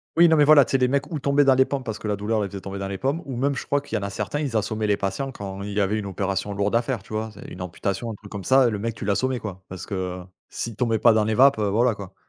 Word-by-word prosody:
Oui, 170 Hz, +1 st, +7 dB
non, 160 Hz, -, +5 dB
mais 150 Hz, -2 st, +5 dB
voilà, 150 Hz, -2 st, +7 dB
tu -, -, -8 dB
sais, 135 Hz, -, +4 dB
les 125 Hz, -, +3 dB
mecs 140 Hz, +6 st, -1 dB
ou 155 Hz, -, -2 dB
tombaient 140 Hz, +1 st, +3 dB
dans 135 Hz, -, +6 dB
les 130 Hz, 0 st, +4 dB
pommes, 140 Hz, -2 st, -3 dB
parce 110 Hz, -2 st, -5 dB
que 110 Hz, -, -5 dB
la 105 Hz, -, 0 dB
douleur 105 Hz, +2 st, -1 dB
les 100 Hz, -, -1 dB
faisait 100 Hz, 0 st, -8 dB
tomber 100 Hz, 0 st, -6 dB
dans 95 Hz, -, -3 dB
les 100 Hz, -, -4 dB
pommes 140 Hz, -, -1 dB
ou 135 Hz, -, -5 dB
même 140 Hz, +3 st, 0 dB
je -, -, -5 dB
crois, 145 Hz, 0 st, +1 dB
qu'il -, -, -6 dB
y -, -, +1 dB
en -, -, -5 dB
a 100 Hz, -, -2 dB
certains 145 Hz, +9 st, -3 dB
ils 135 Hz, -7 st, -1 dB
assommaient 110 Hz, +1 st, -1 dB
les 105 Hz, -, +2 dB
patients, 100 Hz, +9 st, -3 dB
quand 100 Hz, -3 st, -7 dB
il 100 Hz, 0 st, -5 dB
y 105 Hz, -, 0 dB
avait 105 Hz, +2 st, +1 dB
une 100 Hz, -, -5 dB
opération 100 Hz, +1 st, -2 dB
lourde 100 Hz, +2 st, 0 dB
à 115 Hz, -, +4 dB
faire, 125 Hz, 0 st, -3 dB
tu -, -, -11 dB
vois? 110 Hz, +1 st, -2 dB
C'est 100 Hz, -, -12 dB
une 90 Hz, -, -8 dB
amputation 95 Hz, +6 st, -3 dB
un -, -, -6 dB
truc 100 Hz, 0 st, -14 dB
comme 100 Hz, -2 st, -6 dB
ça, 130 Hz, -1 st, +5 dB
heu, -, -, +4 dB
le 105 Hz, -, -3 dB
mec, 115 Hz, +1 st, -3 dB
tu 105 Hz, -, -6 dB
l'assommais, 125 Hz, +6 st, 0 dB
quoi! 95 Hz, -3 st, -7 dB
Parce 90 Hz, -1 st, -7 dB
que, -, -, -7 dB
heu, 90 Hz, -1 st, -3 dB, 0.3 s
s'il 115 Hz, -2 st, -5 dB
tombait 115 Hz, 0 st, +1 dB
pas 115 Hz, -, +6 dB
dans 110 Hz, -1 st, +3 dB
les 110 Hz, +1 st, 0 dB
vapes, 135 Hz, -1 st, +5 dB
heu, 105 Hz, -, +1 dB
voilà, 115 Hz, +3 st, +2 dB
quoi! 100 Hz, -2 st, -10 dB
110 Hz, 350 wpm, -24 LUFS, 100-130 Hz, 0.3 s, Oui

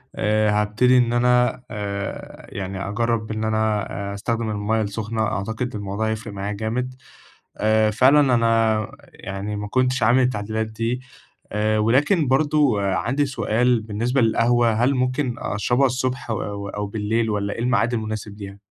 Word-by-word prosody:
آآ 105 Hz, 0 st, +2 dB
هابتدي 110 Hz, +5 st, +3 dB
إن 120 Hz, -1 st, +3 dB
أنا 125 Hz, +1 st, +2 dB
آآ 100 Hz, -2 st, -5 dB
يعني 95 Hz, 0 st, -5 dB
أجرّب 115 Hz, 0 st, -1 dB
إن 110 Hz, 0 st, -3 dB
أنا، 110 Hz, -1 st, +1 dB, 0.3 s
آآ -, -, -5 dB
أستخدم 115 Hz, +2 st, -2 dB
المَيّة 105 Hz, +1 st, 0 dB
السُخنة، 110 Hz, +2 st, -3 dB
أعتقد 110 Hz, +3 st, -3 dB
الموضوع 100 Hz, +1 st, -3 dB
هيفرق 110 Hz, -1 st, -4 dB
معايا 100 Hz, +1 st, -4 dB
جامد، 115 Hz, +5 st, -3 dB, 0.6 s
آآ 110 Hz, 0 st, +3 dB
فعلًا 130 Hz, +7 st, +5 dB
أنا 115 Hz, -2 st, +2 dB, 0.3 s
يعني 100 Hz, +2 st, -5 dB
ما 105 Hz, 0 st, -4 dB
كنتش 130 Hz, +2 st, +1 dB
عامل 120 Hz, +4 st, +4 dB
التعديلات 110 Hz, -2 st, -1 dB
دي، 115 Hz, +3 st, -3 dB, 0.5 s
آآ 110 Hz, +1 st, +1 dB
ولكن 140 Hz, -, +3 dB
برضه 140 Hz, -4 st, +2 dB
عندي 115 Hz, +9 st, 0 dB
سؤال 120 Hz, -1 st, +1 dB
بالنسبة 115 Hz, +5 st, -1 dB
للقهوة، 115 Hz, +1 st, +3 dB
هل 120 Hz, +5 st, +2 dB
ممكن 130 Hz, 0 st, 0 dB
أشربها 120 Hz, +6 st, +1 dB
الصبح 130 Hz, 0 st, -2 dB
أو 100 Hz, -2 st, -3 dB
أو 105 Hz, +1 st, -3 dB
بالليل 110 Hz, +2 st, -1 dB
والّا 100 Hz, -1 st, -1 dB
إيه -, -, -8 dB
الميعاد 120 Hz, -1 st, +1 dB
المناسب 110 Hz, -2 st, -4 dB
ليها؟ 100 Hz, -1 st, -8 dB
110 Hz, 150 wpm, -22 LUFS, 105-125 Hz, 0.6 s, فعلًا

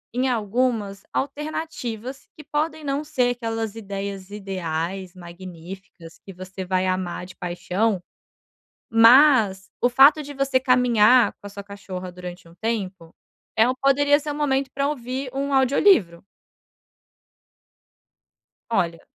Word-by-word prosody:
em 255 Hz, +1 st, +1 dB
algumas 220 Hz, -3 st, -1 dB
alternativas 275 Hz, -4 st, -5 dB
que 305 Hz, -, -11 dB
podem 310 Hz, +2 st, -2 dB
não 280 Hz, +1 st, -2 dB
ser 250 Hz, -5 st, +1 dB
aquelas 225 Hz, -2 st, -3 dB
ideias 200 Hz, -2 st, -6 dB
ideais, 185 Hz, -2 st, -4 dB
magníficas, 175 Hz, 0 st, -11 dB
que 195 Hz, -, -10 dB
você 185 Hz, +1 st, -8 dB
vai 185 Hz, 0 st, 0 dB
amar 185 Hz, -1 st, -2 dB
de 185 Hz, -, -13 dB
paixão. 185 Hz, +3 st, -1 dB, 0.9 s
Mas 225 Hz, -, +6 dB
o 245 Hz, -, +4 dB
fato 275 Hz, +5 st, +6 dB
de 290 Hz, 0 st, -8 dB
você 275 Hz, -1 st, +1 dB
caminhar 250 Hz, -2 st, +4 dB
com -, -, -14 dB
a -, -, -8 dB
sua 200 Hz, 0 st, -8 dB
cachorra 195 Hz, -2 st, -8 dB
durante 180 Hz, -1 st, -10 dB
um 165 Hz, -, -17 dB
tempo 190 Hz, -5 st, -4 dB, 0.4 s
é 225 Hz, +2 st, +4 dB
um 255 Hz, -, 0 dB
poderia 285 Hz, +2 st, +3 dB
ser 300 Hz, 0 st, -6 dB
o -, -, -3 dB
momento 275 Hz, -2 st, 0 dB
pra 280 Hz, +1 st, 0 dB
ouvir 260 Hz, -1 st, -4 dB
um 280 Hz, +1 st, -2 dB
audiolivro. 265 Hz, -, +3 dB, 2.5 s
Olha. 175 Hz, -7 st, -1 dB
225 Hz, 130 wpm, -23 LUFS, 185-270 Hz, 2.5 s, Mas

